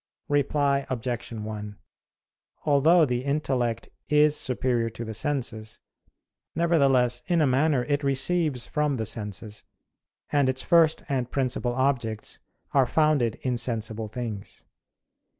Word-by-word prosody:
Reply 140 -1 +1
Obj. 120 -1 -3
1: 105 -2 -6 0.9
Although 155 +3 +5
the 125 -2 -2
intellect 130 -5 -1 0.2
is 150 0 +4
superior 125 -3 0
to 115 +1 -7
the 110 - -5
senses, 115 -4 -3 0.8
nevertheless 135 -7 +3
in 175 -1 +2
a 155 - +4
manner 135 0 +2
it 145 +2 -1
receives 140 0 +1
from 150 -2 0
the 110 -3 -2
senses, 105 -1 -4 0.7
and 145 -3 +3
its 130 0 -2
first 165 -2 +4
and 130 -3 -1
principal 125 -2 -1
objects 125 -5 -1 0.3
are 135 -3 +3
founded 145 -6 +2
in 125 -2 0
sensible 115 -2 -3
things. 110 -3 -7
130 Hz, 120 wpm, -26 LUFS, 115-145 Hz, 0.9 s, Although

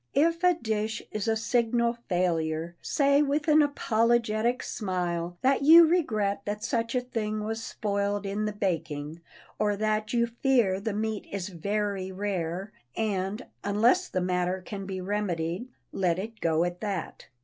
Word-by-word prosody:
If 335 +4 +2
a 360 -1 +5
dish 220 -5 -2
is 215 +1 -3
a 225 - +2
signal 235 +1 +1
failure, 170 -2 0
say 280 0 +3
with 295 +1 0
an 305 0 +6
apologetic 235 -3 +1
smile 175 -3 -3
that 270 +2 +3
you 330 +4 +9
regret 215 - +1
that 210 +1 -3
such 230 +1 -1
a 250 - +2
thing 215 -4 -3
was 225 +1 -3
spoiled 200 -1 -2
in 205 +2 -2
the 210 - -1
baking, 165 -5 -3 0.4
or 210 -1 +2
that 215 0 0
you 235 -1 +3
fear 235 -5 +2
the 215 +1 -3
meat 215 0 -2
is 200 -1 -3
very 200 +1 -2
rare, 190 -1 -3 0.3
and, 210 +1 -1 0.2
unless 235 - +3
the 185 - -2
matter 180 +1 -1
can 195 -2 -6
be 190 -1 -4
remedied, 185 0 -2 0.2
let 180 -3 +1
it 220 +4 -6
go 165 0 +2
at 175 0 -3
that. 200 -5 -4
210 Hz, 155 wpm, -28 LUFS, 185-235 Hz, 0.4 s, you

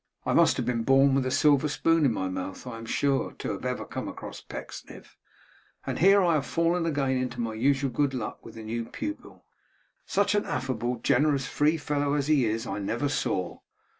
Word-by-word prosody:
I - - +1
must - - +4
have - - -1
been 120 -2 0
born 135 +3 +4
with 135 -1 +1
a - - 0
silver 145 +2 +3
spoon 165 +2 +2
in 130 - +4
my 95 -4 -2
mouth, 95 +3 -5
I 120 -3 -6
am 115 - -9
sure, 140 +3 0
to - - -5
have - - -6
ever - - -2
come - - -5
across - - -8
Pecksniff. - - -10 0.7
And - - -3
here 195 +3 +6
have 180 - +2
I 155 -3 +2
fallen 165 +4 0
again 140 -4 0
into 125 -1 -3
my 115 -1 -2
usual 135 +4 +1
good 140 -1 0
luck 115 -4 -5
with 115 - -12
the 110 - -8
new 115 +1 -3
pupil! 305 - -7 0.6
Such 200 +1 +2
an 205 - +1
affable, 130 -4 -2
generous, 145 -3 +2
free 150 +5 +1
fellow, 145 -1 -1
as 145 -2 0
he 145 -4 +3
is, 115 +2 -1
I 100 -1 -4
never 115 +8 -1
saw. 95 -9 -2
135 Hz, 205 wpm, -27 LUFS, 115-150 Hz, 0.7 s, here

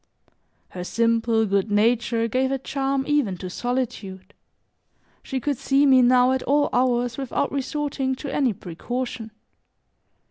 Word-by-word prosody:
Her 180 - -7
simple, 230 +2 +1
good 200 +1 0
nature 230 +2 +2
gave 260 +3 0
a 270 - 0
charm 270 0 -2
even 280 -11 +1
to 185 0 -7
solitude; 205 -6 -4 0.9
she 265 - -4
could 280 0 -2
see 275 +1 +3
me 260 -2 +6
now 250 +1 +5
at 260 0 0
all 290 +1 +2
hours 245 -1 +1
without 270 +1 -2
resorting 275 -1 -2
to 275 +1 -6
any 270 -4 +2
precaution. 225 +6 -5
250 Hz, 135 wpm, -23 LUFS, 225-270 Hz, 0.9 s, me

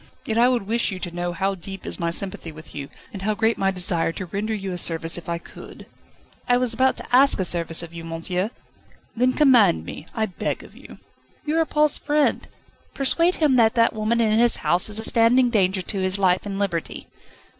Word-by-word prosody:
Yet 225 0 -1
I 245 +1 +5
would 245 -4 0
wish 225 +3 0
you 190 - -5
to 180 -1 -6
know 175 +1 -3
how 195 +3 -1
deep 195 +1 -8
is - - -3
my 170 -1 -1
sympathy 170 -1 -3
with 155 +1 -13
you, 140 -1 -7 0.2
and 195 - -7
how 210 +2 -1
great 225 +1 +1
my 195 - +2
desire 180 -3 +2
to 185 - -6
render 200 +5 -4
you 195 -2 -5
a 180 - -4
service 165 -1 0
if 175 -1 -7
I 170 - -1
could." 170 - -13 0.6
"I 245 - +5
was 250 -2 +1
about 260 +3 +2
to 245 - -2
ask 275 -2 +5
a 190 - +1
service 170 -1 0
of 170 0 -10
you, 165 0 -8
monsieur." 170 +4 -3 0.7
"Then 250 +2 +2
command 245 - +4
me, 155 - -9
I 220 - 0
beg 185 - -4
of - - -16
you." - - -14 0.5
"You 310 +2 0
are 325 - +2
Paul's 300 -1 +2
friend 295 0 0 0.5
persuade 335 +6 +2
him 290 -5 +2
that 225 0 +4
that 230 -1 +3
woman 220 +2 -1
in 220 -1 +2
his 240 0 +5
house 175 +6 +2
is 210 - -2
a 220 - -2
standing 235 +2 +3
danger 190 -4 +1
to 195 - -2
his 185 +1 -1
life 185 0 +1
and 195 -1 -4
liberty." 185 -5 -3
200 Hz, 220 wpm, -23 LUFS, 175-235 Hz, 0.7 s, I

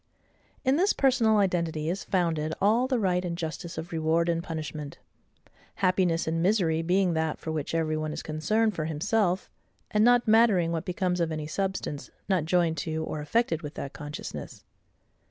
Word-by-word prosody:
In 265 +2 +3
this 385 +5 +3
personal 245 -5 +3
identity 170 -6 0
is 180 +4 -2
founded 160 -4 0
all 225 +6 +3
the 260 -1 +1
right 185 -4 +1
and 170 -2 -3
justice 170 +1 -5
of 160 +2 -6
reward 165 +1 +1
and 170 0 0
punishment; 155 -3 -6 0.8
happiness 185 -3 +2
and 165 +1 -1
misery 175 -4 +2
being 180 +1 +2
that 160 -1 -1
for 160 - -5
which 155 0 -3
every 160 -1 0
one 155 0 -2
is - - -5
concerned 210 +9 +1
for 155 -4 -3
HIMSELF, 185 +4 0 0.4
and 210 0 +3
not 245 0 +4
mattering 215 -7 +4
what 165 -1 -2
becomes 180 0 -1
of 165 -1 0
any 155 -1 -3
SUBSTANCE, 190 -3 -3 0.2
not 185 -6 +1
joined 165 -1 +2
to, 160 +1 -2
or 155 -1 -4
affected 165 +1 0
with 150 -1 -7
that 140 - -6
consciousness. 145 0 -7
170 Hz, 170 wpm, -27 LUFS, 160-195 Hz, 0.8 s, not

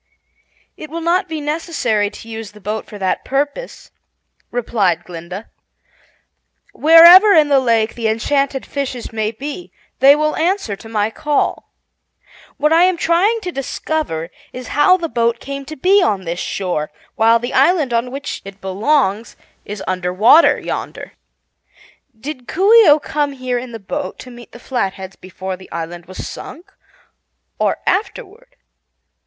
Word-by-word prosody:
"It 310 - -9
will 330 +2 -5
not 355 +3 +1
be 320 -1 -4
necessary 290 - -1
to 225 - -13
use 225 -2 -8
the 210 - -15
boat 210 +2 -4
for 210 - -10
that 190 -2 -1
purpose," 285 - -4 0.6
replied 200 -8 0
Glinda. 180 +4 -9 1.2
"Wherever 340 +6 +8
in 305 -4 +4
the 280 -1 +5
lake 230 -3 +1
the 230 -2 -2
enchanted 270 +5 0
fishes 260 -5 -5
may 215 -1 -1
be, 285 +10 -7 0.3
they 275 +2 +7
will 305 0 0
answer 335 - -1
to 225 +3 -13
my 215 -1 -1
call. 295 +4 -1 0.9
What 300 +2 +2
I 335 +2 +5
am 370 -1 +1
trying 375 +8 +2
to 365 -3 -5
discover 270 - -3 0.2
is 250 -2 -8
how 370 +6 +4
the 340 -2 -3
boat 235 -5 0
came 275 0 -7
to 310 +3 -8
be 385 +8 +3
on 200 - 0
this 170 0 -4
shore, 175 -6 -3 0.2
while 225 +1 +4
the 240 +1 -5
island 280 -2 +3
on 235 +2 0
which 280 +2 -6
it 195 0 -11
belongs 210 +2 0 0.3
is 205 -1 -7
under 185 -1 -2
water 225 - +5
yonder. - - -6 1.1
Did 260 0 -7
Coo 390 +6 +2
ee 455 -7 +8
oh 295 - +7
come 295 -1 -2
here 255 -2 -3
in 245 0 -8
the 230 - -6
boat 275 +9 -5
to 255 - -11
meet 240 0 -13
the - - -12
Flatheads 195 -7 -4
before 185 0 -7
the 185 +1 -16
island 170 +1 -6
was 185 - -7
sunk, 360 +6 -10 0.9
or - - +1
afterward?" 445 +4 -3
255 Hz, 155 wpm, -18 LUFS, 210-310 Hz, 1.2 s, Wherever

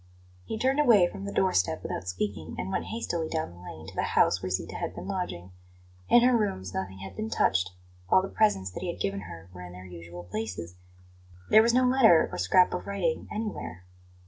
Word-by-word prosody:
He 220 - -4
turned 265 +5 +1
away 225 -11 +6
from 195 - -8
the 200 - -4
door 190 -2 +2
step 90 - +1
without 90 - -4
speaking, 90 -3 -3
and 95 - -4
went - - -1
hastily 170 -8 -3
down 160 - -2
the 85 - -15
lane 80 -3 -10
to - - -10
the - - -1 0.2
house 90 - +4
where 95 - -3
Zita 90 - -3
had - - -4
been - - -7
lodging. 180 - -4 0.6
In 240 - +7
her 250 0 +5
rooms 95 - -1
nothing 95 0 -4
had 95 -1 -8
been 110 +3 -3
touched; 95 -3 +2 0.4
all 185 - +5
the - - -2
presents 145 - +1
that - - -7
he 180 -2 -2
had - - -11
given 200 0 -1
her 85 - -10
were 90 - -10
in 90 0 -9
their 90 +1 -10
usual 85 0 -9
places; 90 -2 -5 0.8
there 215 - +9
was 235 +1 +3
no 255 - +5
letter 245 -10 +6
or - - -5
scrap 140 - +4
of 180 - -4
writing 185 -5 -1
anywhere. 210 - -5
110 Hz, 220 wpm, -28 LUFS, -, 0.8 s, there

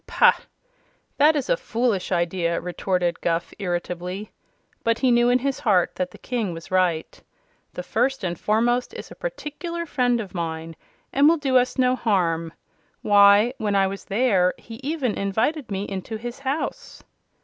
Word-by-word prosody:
"Pah! - - +5 0.8
That 300 +2 +5
is 290 - -1
a - - +3
foolish 230 - -1
idea," 170 -1 0
retorted 180 -1 -1
Guph, 170 0 -1
irritably, 180 +1 -4 0.5
but 230 0 +2
he 255 0 +2
knew 240 0 +4
in 245 - +5
his 270 +1 -2
heart 190 -6 +2
that 180 0 -1
the - - -14
King 230 -8 -3
was 165 +3 -10
right. 180 -4 0 0.5
"The 180 - -5
First 255 +5 0
and 175 -2 -3
Foremost 240 +3 +1
is - - -8
a - - -9
particular 340 - -5
friend 245 -5 +1
of 205 -4 -6
mine, 165 -2 -4 0.4
and 285 +2 +5
will 335 - +3
do 275 -3 -1
us 250 +1 +3
no 255 -1 +3
harm. 170 -8 0 0.5
Why, 205 +3 +6
when 210 -2 0
I 195 -1 +4
was 195 +1 -5
there, 195 -4 +2
he 225 -1 -11
even 275 -5 -1
invited 225 +9 -1
me 195 -1 -2
into 200 +2 -5
his 240 +3 -7
house." 275 +3 -4
215 Hz, 165 wpm, -23 LUFS, 180-255 Hz, 0.8 s, Why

